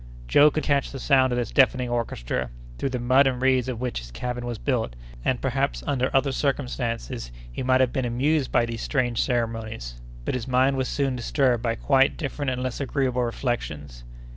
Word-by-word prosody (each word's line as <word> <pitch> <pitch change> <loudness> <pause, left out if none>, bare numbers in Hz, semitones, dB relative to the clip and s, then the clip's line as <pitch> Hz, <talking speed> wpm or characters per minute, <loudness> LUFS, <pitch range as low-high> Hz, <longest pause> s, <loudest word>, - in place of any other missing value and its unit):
Joe 145 - +6
could 155 +1 -2
catch 140 -2 +1
the 135 - -6
sound 130 -1 +3
of 120 - 0
this 120 -3 -2
deafening 130 -2 +3
orchestra, 65 - -2 0.3
through 135 - 0
the 130 - -2
mud 130 +3 +4
and 125 -2 0
reeds 130 -1 +2
of 120 -3 -4
which 125 - -2
his - - -10
cabin 120 - -4
was 120 -2 -3
built; 115 - -1 0.3
and - - +1
perhaps - - -1
under 130 -2 0
other 135 +1 +2
circumstances 125 - -2 0.2
he - - -5
might 130 0 +3
have 130 -2 +2
been 130 -3 0
amused 135 +4 +1
by 120 - +3
these 115 -1 -5
strange 125 -5 0
ceremonies; 115 - -3 0.2
but - - -1
his 125 -2 -3
mind 130 +2 +3
was 130 -1 -1
soon 135 -1 0
disturbed 125 0 +1
by 115 -1 0
quite 135 +3 +3
different 145 -2 -3
and 125 0 -2
less 130 +1 -3
agreeable 130 -2 0
reflections. 75 - -3
125 Hz, 195 wpm, -25 LUFS, 115-135 Hz, 0.3 s, Joe